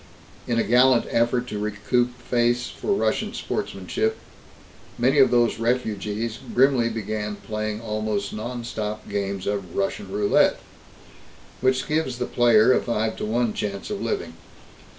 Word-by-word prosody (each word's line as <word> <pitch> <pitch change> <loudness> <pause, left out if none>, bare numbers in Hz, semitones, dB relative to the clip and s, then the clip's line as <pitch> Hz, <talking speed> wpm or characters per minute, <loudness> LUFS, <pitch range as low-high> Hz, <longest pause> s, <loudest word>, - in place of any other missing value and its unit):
In 120 - 0
a 115 - +3
gallant 125 +1 +4
effort 120 +1 +2
to 105 - -4
recoup 115 +4 0
face 120 0 +1
for 420 - -4
Russian - - 0
sportsmanship, 445 +1 -2 0.8
many 130 +4 +3
of 135 - +7
these 120 -2 +2
refugees 115 -2 -1 0.2
grimly 125 -2 +4
began 105 -1 -3
playing 110 0 -4
almost 105 -2 -2
non 120 +3 -5
stop 110 -2 -4
games 100 -1 -3
of 100 -4 -3
"Russian 95 0 -2
roulette," 105 0 +3 1.0
which 130 0 +1
gives 150 -5 0
the 125 - -1
player 120 0 +5
a - - +2
five 110 -2 -1
to - - -3
one 115 0 0
chance 100 - -4
of 200 -1 -3
living. 420 -1 -2
115 Hz, 140 wpm, -24 LUFS, 105-125 Hz, 1.0 s, of